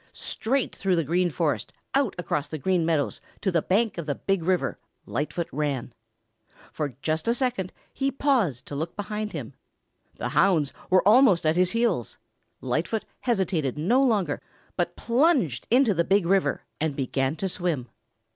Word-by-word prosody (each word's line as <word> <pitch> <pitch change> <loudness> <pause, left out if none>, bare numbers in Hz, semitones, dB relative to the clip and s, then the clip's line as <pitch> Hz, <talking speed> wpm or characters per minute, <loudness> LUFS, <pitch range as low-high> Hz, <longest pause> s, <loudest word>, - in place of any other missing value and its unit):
Straight 260 +4 -1
through 190 -2 +1
the 165 - +1
Green 175 +4 +1
Forest, 150 - -1 0.2
out 270 -6 +2
across 150 -4 -2
the 155 - -5
Green 180 +4 +1
Meadows 160 -3 0 0.2
to 195 - +1
the 170 -2 +2
bank 205 +1 +1
of 165 - -5
the 145 - 0
Big 195 -2 0
River, 180 +2 0 0.3
Lightfoot 160 +3 -2
ran. 140 -4 -2 0.8
For 145 -5 -3
just 160 +3 -1
a 235 - +3
second 245 -8 -1 0.2
he 270 +1 0
paused 235 - +1
to 145 - -7
look 160 +4 -3
behind. 210 +1 -4 0.6
The - - -3
hounds 165 -8 +3 0.2
were 185 +1 +4
almost 210 -7 +6
at 155 +1 +3
his 180 0 +3
heels. 235 +1 0 0.4
Lightfoot 220 -2 -1
hesitated 185 - 0
no 220 - +3
longer 205 - +1 0.3
but - - -1
plunged 240 - +2
into 245 -2 +4
the 170 -1 +2
Big 195 +1 +2
River 180 -6 +2 0.2
and 155 -2 -1
began 135 +1 -1
to 190 +4 -2
swim. 170 -8 -2
180 Hz, 160 wpm, -26 LUFS, 155-220 Hz, 0.8 s, almost